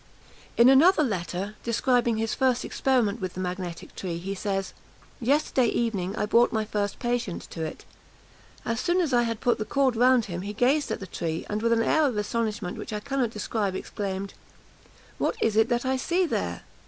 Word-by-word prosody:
In 235 - +7
another 310 +6 +6
letter, 195 - -3
describing 235 0 +1
his 225 0 -1
first 260 -2 +1
experiment 240 -5 +1
with 185 -1 -4
the - - -5
magnetic 180 -2 -5
tree, 175 -3 -4
he 190 +3 -4
says, 195 -1 -3 0.5
"Yesterday 260 -1 +2
evening 205 -5 -1
I - - 0
brought 235 +3 +4
my 220 -1 0
first 205 -2 -2
patient 240 -6 -2
to 165 - -4
it. 155 - -6 0.8
As 230 0 -1
soon 345 +6 +1
as 320 -7 0
I 240 - +5
had 230 -2 -2
put 245 - +2
the - - 0
cord 265 +1 +1
round 250 0 +4
him 175 -2 -5
he 205 +2 -5
gazed 265 +7 +2
at - - -3
the - - -5
tree; 165 -3 -4
and, 210 +1 -1
with 230 +1 +1
an 230 0 +3
air 315 +3 +3
of 245 -6 -2
astonishment 210 -3 -2
which 225 - -6
I 210 - -2
cannot 270 0 -1
describe, 210 -2 -2
exclaimed, 195 0 -4 0.9
'What - - 0
is 220 -2 +1
it 220 +2 +4
that 240 0 0
I 260 0 +1
see 350 +8 +1
there?' 90 - -2
225 Hz, 195 wpm, -26 LUFS, 195-250 Hz, 0.9 s, In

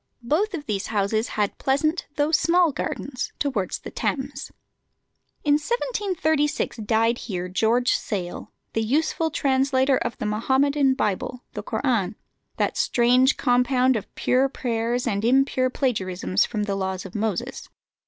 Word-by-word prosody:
Both 360 - +1
of 295 -3 -6
these 205 -5 -2
houses 215 +2 0
had 205 -1 0
pleasant 310 +5 0
though 295 +1 +1
small 340 +1 +4
gardens 275 -1 -4
towards 245 -10 -1
the - - -9
Thames. 275 0 -3 0.9
In 290 - +3
1736 325 - -1
died 225 +2 +1
here 180 -4 -4
George 225 +6 +2
Sale, 180 -5 -3 0.2
the 225 - 0
useful 310 +7 +1
translator 270 -3 +2
of - - -3
the - - -4
Mohammedan 265 +5 +2
Bible, 230 +3 -2
the 210 - -4
Koran, 220 -3 -1 0.4
that - - 0
strange 250 +3 +3
compound 250 0 +3
of 215 - -4
pure 260 +2 +2
prayers 240 -1 -1
and 205 -3 -1
impure 255 +1 +3
plagiarisms 190 -8 0
from 215 -3 -2
the 205 -1 -2
laws 190 -1 -3
of 190 - -9
Moses. 220 +4 -3
250 Hz, 135 wpm, -24 LUFS, 215-280 Hz, 0.9 s, small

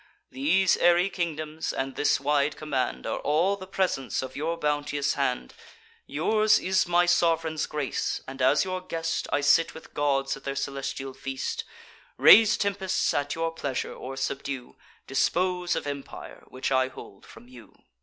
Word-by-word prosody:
These 170 +8 +2
airy 175 +2 +4
kingdoms, 155 -3 -3
and 135 0 -3
this 145 - +2
wide 145 +1 +1
command, 130 - -2
Are - - -2
all 170 +7 +2
the 190 -1 -10
presents 180 -10 -1
of 130 0 -8
your 165 +4 -2
bounteous 145 -2 0
hand: 125 - -2 0.5
Yours 215 +8 +3
is 185 -1 +1
my 175 0 +4
sov'reign's 165 -3 +1
grace; 150 -3 -2
and, 135 0 -7
as 135 +7 +4
your 185 -1 -3
guest, 165 -2 -3
I 145 - +1
sit 165 +3 +3
with 160 - -12
gods 135 -2 0
at 135 - -13
their 140 0 -3
celestial 135 -1 -4
feast; 135 0 -4 0.5
Raise 220 -1 +8
tempests 195 -2 0
at 145 0 -1
your 165 0 -1
pleasure, 140 -5 -3
or 135 +1 -8
subdue; 135 -1 -4 0.3
Dispose 180 +6 0
of - - -3
empire, 140 -1 -7
which 130 +1 -4
I 130 0 +3
hold 130 -6 -12
from 115 +2 -15
you." 120 -5 -15
150 Hz, 155 wpm, -27 LUFS, 135-175 Hz, 0.5 s, Raise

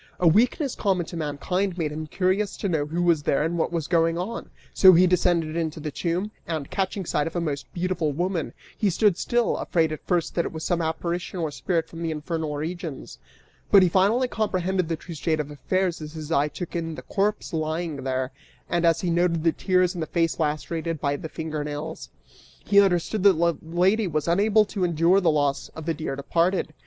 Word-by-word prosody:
A 180 - +4
weakness 245 - +3
common 190 -4 0
to 170 - -9
mankind 170 +5 -2
made 155 -4 -1
him 155 +1 -5
curious 190 +5 0
to 200 - -2
know 155 -5 0
who 170 +3 -1
was 170 -3 +3
there 145 0 +1
and 165 +2 -1
what 170 - 0
was 165 -3 -2
going 165 -1 +2
on, 205 +7 -4 0.2
so 185 -1 +8
he 180 +2 +6
descended 175 -3 +2
into 160 -1 -2
the 150 0 -4
tomb 180 +7 -2 0.2
and, 155 -4 -4
catching 195 -1 -2
sight 150 -2 0
of 165 - -7
a - - +1
most 150 -4 -4
beautiful 175 -3 -1
woman, 175 +2 -2 0.2
he 210 - +1
stood 200 +1 +3
still, 240 +5 0
afraid 160 -2 +1
at 155 - -6
first 175 -3 0
that 170 - +1
it - - -4
was 160 -1 -6
some 175 0 0
apparition 170 +3 -3
or 160 -3 -2
spirit 165 +1 -1
from 165 0 -9
the 165 - -1
infernal 155 -1 -3
regions; 160 -2 -6 0.5
but 195 -2 +7
he 180 - +4
finally 205 +8 +3
comprehended 190 -6 -1
the 165 - 0
true 170 +2 -10
state 155 0 -1
of 150 -1 -3
affairs 180 +4 -1
as 150 0 -7
his 155 -1 -7
eye 145 -2 +3
took 170 +5 -7
in 165 -2 -3
the - - -9
corpse 205 -1 -1
lying 160 0 -2
there, 130 0 -2 0.4
and 175 0 0
as 165 0 +3
he 175 - 0
noted 170 -1 +1
the 165 - +4
tears 185 +1 +1
and 175 - -5
the 160 - -2
face 165 0 0
lacerated 160 +1 -2
by 140 0 0
the 160 - -6
finger 155 -2 -4
nails, 150 - -6 0.6
he 200 0 +6
understood 190 +2 +1
that 200 0 +7
the 170 0 +1
lady 185 +6 +1
was 155 -2 -2
unable 210 +5 +4
to 200 -2 -3
endure 170 +3 +3
the 175 - +3
loss 145 -2 0
of 160 - -7
the 165 - 0
dear 155 -3 -4
departed. 165 +4 0
170 Hz, 215 wpm, -25 LUFS, 155-185 Hz, 0.6 s, so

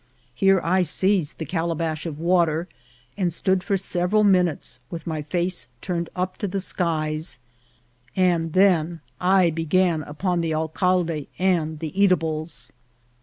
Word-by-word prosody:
Here 195 +8 +4
I 185 +3 +2
seized 180 -1 +1
the 160 - -4
calabash 165 -1 -2
of 150 -3 -5
water, 170 0 +2 0.5
and 180 -3 0
stood 185 +2 +1
for 200 0 +1
several 185 +3 +1
minutes 180 -9 +1
with 165 -2 -7
my 160 -2 -3
face 175 -1 -1
turned 170 0 -3
up 185 +1 -2
to 205 - -1
the 195 +1 -2
skies, 155 -6 -1 0.8
and 170 -4 +2
then 175 -4 +3 0.2
I 185 -1 +4
began 165 +1 +1
upon 170 +4 -2
the 160 -1 -1
alcalde 165 -1 0
and 170 -4 +1
the 155 0 -5
eata 195 -2 +4
bles. 155 0 -4
170 Hz, 140 wpm, -23 LUFS, 160-185 Hz, 0.8 s, Here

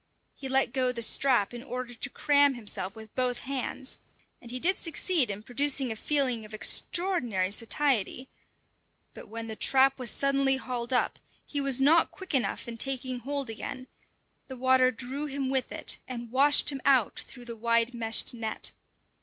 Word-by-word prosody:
He 270 - -7
let 265 +1 +1
go 255 -2 +1
the 235 -2 -1
strap 245 -3 +2
in 240 - -7
order 250 -1 -6
to 240 +1 -5
cram 285 -1 +3
himself 205 -4 -3
with 220 -1 -12
both 250 -1 -1
hands, 265 0 -4 0.4
and 235 - -13
he 255 +1 -4
did 370 +7 +5
succeed 330 - +1
in 205 +1 -5
producing 270 +1 0
a - - -3
feeling 255 -2 +1
of 215 0 -9
extraordinary 245 - 0
satiety; 250 +2 0 0.9
but - - -11
when 230 +1 -6
the 220 - -5
trap 270 +3 +3
was 250 -2 -1
suddenly 275 -1 +2
hauled 245 -2 -5
up, 250 - 0 0.3
he 285 - -2
was 275 -2 +2
not 315 +5 +4
quick 375 -4 -9
enough 260 -3 0
in 235 -1 -7
taking 255 0 -1
hold 280 +2 -3
again; 255 +3 -6 0.6
the 260 - -8
water 260 0 +4
drew 260 +4 -4
him 270 -2 -3
with 265 -1 -1
it, - - -1
and 240 -2 -7
washed 280 +3 +4
him 275 -2 -6
out 260 -6 +3
through 245 -2 -12
the 235 -1 -7
wide 230 +1 +1
meshed 225 0 +2
net. 225 -2 -4
255 Hz, 175 wpm, -28 LUFS, 235-275 Hz, 0.9 s, did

